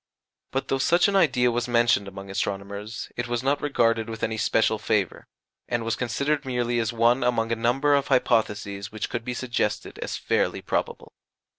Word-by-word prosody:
But 135 0 -3
though 135 - +1
such 175 +7 +4
an 200 - 0
idea 125 -9 +4
was 120 +1 -1
mentioned 120 -4 +3
among 95 0 -8
astronomers, 100 +3 -4
it 120 - -3
was 120 0 -2
not 140 +2 +1
regarded 115 -5 +1
with 110 -1 -6
any 110 - 0
special 110 0 +2
favour, 105 -3 -1 0.4
and 120 -1 -1
was 115 - 0
considered 140 +5 -1
merely 120 -2 -1
as 115 0 0
one 120 +2 +3
among 115 -2 +1
a - - +2
number 125 +6 +2
of 140 -1 +2
hypotheses 105 -5 0
which 110 -1 -4
could 120 - -3
be 125 0 -4
suggested 120 -4 -2
as - - -4
fairly - - 0
probable. - - -3
120 Hz, 180 wpm, -25 LUFS, 110-130 Hz, 0.4 s, such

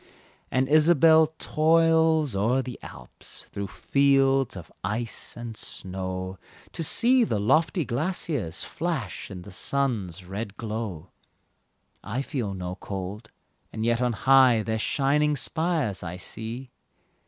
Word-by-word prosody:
And 130 +1 +1
Isabelle 160 +1 +6
toils 160 -3 +3
o'er 120 +7 +2
the 125 -2 -7
Alps, - - -10
Through 100 0 -4
fields 135 0 +2
of 85 -2 -10
ice 110 +6 -3
and 120 -1 -6
snow, 95 -2 -5 0.3
To 165 - -3
see 245 - +4
the 160 - 0
lofty 155 - +2
glaciers 140 - -2
Flash 155 - -4
in 90 -3 -8
the 100 - -11
sun's 100 -6 -1
red 100 +2 -6
glow. 105 -7 -5 0.9
I 120 +7 -3
feel 120 -10 -3
no 90 0 -5
cold, 100 +4 -6 0.4
and 110 0 -3
yet 120 +1 +1
on 125 -1 +1
high 130 -2 +5
Their 110 0 -2
shining 150 +5 +2
spires 155 - -1
I 90 0 -6
see. 115 +7 -5
120 Hz, 125 wpm, -26 LUFS, 100-150 Hz, 0.9 s, Isabelle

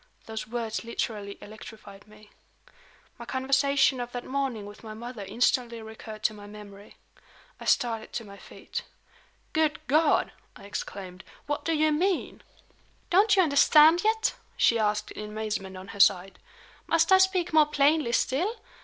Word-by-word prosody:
Those 220 -1 -6
words 230 -1 -4
literally 210 -3 -4
electrified 215 -1 -12
me. 215 0 -18 0.9
My - - -8
conversation 270 0 +2
of 245 0 -5
that 245 0 -5
morning 260 -6 -2
with 205 +2 -12
my 215 -1 -8
mother 235 -1 -7
instantly 235 +3 0
recurred 220 -1 -10
to 215 - +2
my 205 -1 -11
memory. 205 -1 -13 0.6
I - - -9
started 225 -2 0
to 235 - -3
my 200 -1 -12
feet. - - -7 0.7
"Good 310 -1 +1
God!" 305 +3 +2 0.2
I - - -14
exclaimed, 190 -2 -7 0.2
"what 290 0 -3
do 330 - +1
you 310 0 +2
mean?" 360 +4 -1 0.7
"Don't 405 +4 +5
you 380 - +5
understand 310 +2 +6
yet?" 445 +1 +1 0.2
she 230 - +3
asked 210 -1 0
in 210 0 -7
amazement 210 -3 -4
on 190 +1 -10
her 200 - -9
side. 195 -1 +3 0.5
"Must 330 +2 +2
I 380 - +8
speak 375 -3 +2
more 310 -1 +6
plainly 295 -3 +2
still? 340 - 0
235 Hz, 155 wpm, -27 LUFS, 210-300 Hz, 0.9 s, I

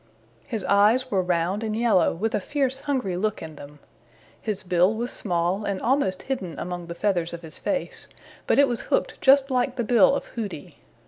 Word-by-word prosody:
His 220 -4 -3
eyes 215 +7 +3
were 195 -2 +2
round 180 +3 0
and 215 -1 -2
yellow 225 -7 +3
with 220 +6 -2
a - - +1
fierce 265 +3 -1
hungry 260 -10 -2
look 210 +3 -1
in 155 -1 -8
them. 145 +1 -12 0.6
His 210 -3 -3
bill 180 +3 +2
was 240 +3 -3
small 180 +1 -1
and 200 -2 -2
almost 235 -7 0
hidden 195 -11 -4
among 175 -1 -5
the 170 - -6
feathers 175 -3 0
of 170 - -12
his 160 -1 -11
face, 275 -2 -3 0.4
but - - +3
it 280 0 +6
was 240 -2 -2
hooked - - 0
just 275 0 +5
like 250 0 +1
the 240 - -1
bill 235 +2 +5
of - - -3
Hooty. 205 -10 -6
210 Hz, 195 wpm, -25 LUFS, 180-250 Hz, 0.6 s, it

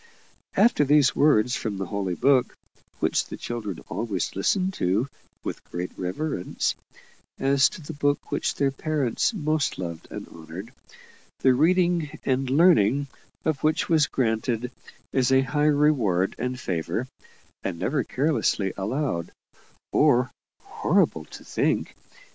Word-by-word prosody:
After 235 - +4
these 145 -1 +4
words 125 -5 +4
from 105 -3 -3
the 95 - -3
Holy 95 -1 -2
Book 135 +2 +3 0.4
(which - - +1
the - - -7
children 110 -7 -5
always 105 -6 -3
listened 185 - +1
to 100 - 0 0.4
with - - -5
great 90 +1 -5
reverence, 95 - -2 0.6
as 135 0 +4
to 165 - -10
the 160 - -7
Book 145 0 -1
which - - -1
their 140 -1 +1
parents 140 - 0
most 155 -7 -1
loved 85 -3 -6
and - - -7
honoured, 85 +8 -10 0.7
the 130 - +5
reading 170 +2 +2
and 130 0 0
learning 140 - +4 0.4
of 155 -4 0
which 155 0 +1
was 155 -3 +4
granted 120 0 -1 0.4
as 130 0 +2
a 130 0 +5
high 145 +2 +1
reward 130 -12 +2
and 125 +2 -2
favour, 95 +6 -2 0.6
and - - -3
never 135 - 0
carelessly 130 -8 0
allowed, 100 - -2 0.6
or 125 -4 +3 0.3
horrible - - +1
to - - -12
think! - - -1
130 Hz, 130 wpm, -25 LUFS, 100-150 Hz, 0.7 s, the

